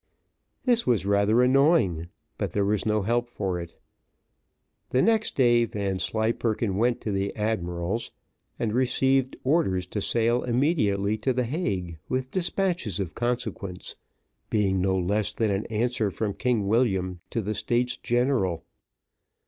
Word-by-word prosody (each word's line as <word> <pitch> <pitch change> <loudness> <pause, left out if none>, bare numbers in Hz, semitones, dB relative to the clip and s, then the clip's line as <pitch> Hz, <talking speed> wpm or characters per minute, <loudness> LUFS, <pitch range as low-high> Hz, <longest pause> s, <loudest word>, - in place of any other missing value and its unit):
This 240 -2 +2
was 115 -6 +2
rather 100 +4 +3
annoying, 125 - +3 0.3
but - - -2
there 100 -1 +1
was 105 +1 0
no 105 -1 +1
help 120 +3 0
for 95 -6 -2
it. 85 -1 -8 1.1
The 130 - +1
next 220 +1 +2
day 120 -3 +4
Vanslyperken 110 +1 -1
went 120 +2 +1
to 105 - -3
the 100 0 -2
admiral's, 95 -1 -2 0.5
and 110 -2 -1
received 130 +1 +2
orders 130 - +1
to 105 +3 -4
sail 120 +3 +1
immediately 110 - +1
to 130 +4 0
the 125 0 0
Hague 95 - -3
with 130 0 -2
despatches 175 - -1
of 90 -4 -3
consequence, 120 -6 -3 0.5
being 95 -3 +1
no 95 0 +1
less 100 +3 0
than 110 -3 +1
an 100 +1 -2
answer 115 -1 0
from 105 +1 -2
King 120 -5 0
William 95 -5 +1
to - - -2
the 105 0 -2
States 120 +4 0
General. 120 -8 0
110 Hz, 140 wpm, -26 LUFS, 100-125 Hz, 1.1 s, day